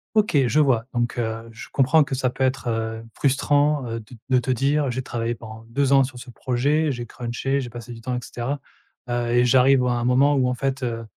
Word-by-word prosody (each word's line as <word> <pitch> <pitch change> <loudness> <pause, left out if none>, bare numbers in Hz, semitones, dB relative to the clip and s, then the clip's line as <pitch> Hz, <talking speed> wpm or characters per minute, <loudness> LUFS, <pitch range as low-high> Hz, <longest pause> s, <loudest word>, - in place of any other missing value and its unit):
OK, 210 -6 +2
je 150 +6 +2
vois 125 -6 +3
donc 120 +1 -1
heu, 115 0 -3
je 110 - -10
comprends 140 +3 +4
que 140 -2 -3
ça 130 -1 0
peut 130 - -3
être, 130 -1 0
heu, 110 0 -3
frustrant, 145 0 +2
heu, 115 0 -4
de 115 +3 -13
de 130 -1 +4
te 125 - -5
dire: 140 +2 +1
«J'ai 130 +1 -3
travaillé 120 -1 -3
pendant 110 0 -11
2 140 +3 +1
ans 135 -1 +6
sur 130 -1 -6
ce 125 0 -10
projet, 140 +6 0
j'ai 120 -2 -5
crunché, 125 +4 -2
j'ai 125 - -6
passé 120 +1 -9
du 115 - -11
temps 125 +1 -3
et - - -2
cetera, 135 +4 -4 0.5
heu, 120 -1 -1
et 120 +1 +3
j'arrive 130 +1 +5
à 125 - +1
un 120 0 -1
moment 140 +3 +4
où 130 -2 +2
en 125 - 0
fait, 135 +1 -2
heu 115 -2 -3
125 Hz, 235 wpm, -23 LUFS, 120-135 Hz, 0.5 s, ans